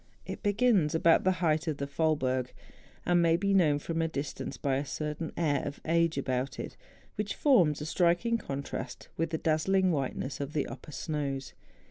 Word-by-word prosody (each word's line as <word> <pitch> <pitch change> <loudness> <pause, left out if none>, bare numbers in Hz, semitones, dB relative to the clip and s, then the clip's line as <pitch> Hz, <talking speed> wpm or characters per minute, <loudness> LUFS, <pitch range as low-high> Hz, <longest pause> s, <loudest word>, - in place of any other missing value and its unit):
It - - -6
begins 205 -7 +2
about 165 +2 +4
the 185 - +4
height 155 +1 +1
of 155 -3 -1
the 140 - -2
Faulberg. 135 -4 0 0.5
It 175 - +2
may 170 -1 +4
be 200 +2 +1
known 160 -7 +4
from 165 +3 -2
a 165 - +1
distance 140 -4 -5
by 135 -2 0
a 140 - -1
certain 150 +2 -4
air 145 -5 +1
of 140 - -5
age 165 0 +2
about 130 0 -2
it - - -6 0.4
wliich 210 -1 -1
forms 175 - +3
a - - -3
striking 175 +8 +2
contrast 140 -5 -6
with 165 0 -1
the 160 - -1
dazzling 180 +5 +2
whiteness 135 -1 -2
of 140 +1 -4
the 150 - 0
upper - - -9
snows. 140 -1 -3
155 Hz, 180 wpm, -30 LUFS, 140-170 Hz, 0.5 s, about